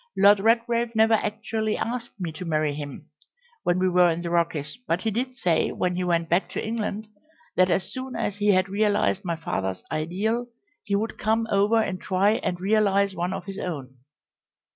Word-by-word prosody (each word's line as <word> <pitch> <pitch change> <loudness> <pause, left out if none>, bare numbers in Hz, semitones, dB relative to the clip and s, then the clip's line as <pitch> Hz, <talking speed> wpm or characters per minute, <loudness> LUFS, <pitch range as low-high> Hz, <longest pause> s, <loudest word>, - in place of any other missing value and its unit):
Lord 200 +1 +6
Redgrave 230 +2 +1
never 220 +1 +5
actually 215 0 -1
asked 235 -1 -4
me 175 -3 -3
to 155 - -8
marry 155 -3 0
him 145 -1 -8 0.5
when 175 - +1
we 185 0 +2
were 180 -1 +5
in 170 +1 -2
the 170 - -3
Rockies, 165 -2 0
but 170 +2 0
he 220 - 0
did 250 +4 -2
say 175 -7 +1
when 180 0 -1
he 180 +1 -1
went 170 -2 +1
back 175 +3 +1
to - - -3
England 215 -1 -3 0.5
that 185 0 +4
as 175 +1 0
soon 260 -1 -6
as 205 -3 -2
he 205 0 0
had 185 -2 +4
realised 205 0 +1
my 170 -3 -1
father's 95 - -3
ideal 200 +10 -1 0.4
he 200 - -1
would 215 +2 -2
come 225 +1 +1
over 205 +3 +3
and 190 -4 -2
try 195 +2 +2
and 180 - -3
realise 200 0 +2
one 175 0 -2
of 185 - -5
his 195 0 -6
own. 135 -7 -5
195 Hz, 190 wpm, -25 LUFS, 175-220 Hz, 0.5 s, Lord